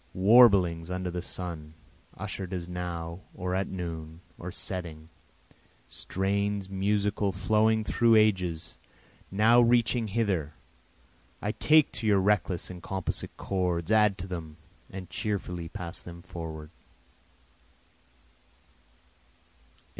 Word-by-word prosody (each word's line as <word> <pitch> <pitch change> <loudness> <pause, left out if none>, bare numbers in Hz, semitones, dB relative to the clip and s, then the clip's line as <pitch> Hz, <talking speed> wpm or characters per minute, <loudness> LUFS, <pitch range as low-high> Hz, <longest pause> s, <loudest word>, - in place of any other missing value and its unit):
Warblings 95 -5 +5
under 90 0 -3
the 90 0 -3
sun, 85 -4 -6 0.4
usher'd 95 -1 -4
as 85 -2 -4
now, 85 -1 -5 0.2
or 90 0 -3
at 95 +1 0
noon, 80 -3 -6 0.2
or - - -6
setting, 80 -3 -4 0.8
Strains 100 0 -2
musical 100 +1 0
flowing 110 +3 +2
through 115 +1 +3
ages, 95 -7 +1 0.5
now 110 +5 +5
reaching 120 -1 +3
hither, 95 -8 -1 0.8
I 105 - -2
take 155 +5 +4
to 110 - -4
your 100 -2 +4
reckless 95 -3 0
and 90 -1 -9
composite 95 0 -4
chords, 90 -1 -1
add 105 -2 +4
to 90 - -6
them, 80 -4 -7 0.3
and 95 -1 -8
cheerfully 90 -5 -3
pass 85 +1 -7
them 85 -1 -11
forward. 80 -4 -7
95 Hz, 110 wpm, -28 LUFS, 85-105 Hz, 0.8 s, Warblings